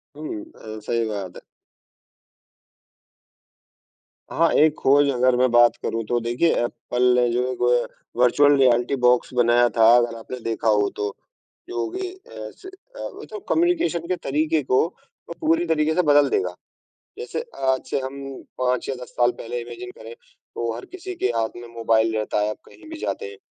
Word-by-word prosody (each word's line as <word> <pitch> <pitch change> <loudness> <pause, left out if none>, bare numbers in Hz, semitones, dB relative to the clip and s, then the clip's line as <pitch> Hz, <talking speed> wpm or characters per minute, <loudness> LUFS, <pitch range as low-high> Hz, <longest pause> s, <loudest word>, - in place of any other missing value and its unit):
हुँ। 320 0 -6
अ, 110 0 -9
सही 115 +2 -1
बात 100 -4 -5
है। - - -12 2.9
हाँ, 165 +1 +3
एक 155 0 +4
खोज 140 +1 +4
अगर 125 0 +3
मैं 130 +1 +3
बात 120 0 +6
करूँ 115 0 -2
तो 120 - +2
देखिए, 120 +8 +1 0.2
एप्पल 125 +1 +1
जो 125 +1 +1
एक 125 - -7
ओ, 120 - +3 0.2
अ, - - -8 0.3
वर्चुअल 145 +4 +5
रियलिटी 125 0 +3
बॉक्स 125 +1 +3
बनाया 120 0 +4
था 115 - +6
अगर 120 -1 +1
आपने 125 +3 -8
देखा 115 0 -2
हो 105 -2 +3
तो, 105 -1 -3 0.5
जो 370 +1 -2
कि 380 0 -3
अ, 375 +1 -10
से 380 - -14
अ, - - -17 0.2
वो - - -9
तो 425 - -6
कम्युनिकेशन 330 - +1
के 185 - 0
तरीके 155 +1 0
को 130 0 +3 0.5
वो - - -4
पूरी 165 +2 +2
तरीके 160 -1 +1
से 180 - +4
बदल 145 -3 +4
देगा। 405 - -1 0.6
जैसे 470 +1 -4 0.3
आज 130 - -2
से - - 0
हम 135 +1 -6 0.4
5 125 -1 0
या 135 - -1
10 - - -18
साल 120 0 +4
पहले 120 +1 -4
इमैजिन 365 - -8
करें, 475 - -10
तो - - -7
हर - - -8
किसी 375 +1 -8
के - - 0
हाथ 115 -1 -1
में 120 0 -9
मोबाइल 115 -1 +2
रहता 105 -1 -1
है, 105 +1 +1
आप 105 - -5
कहीं 315 - -16
भी 320 - -6
जाते 450 - -3
हैं। 425 - -12
130 Hz, 180 wpm, -23 LUFS, 120-175 Hz, 2.9 s, बात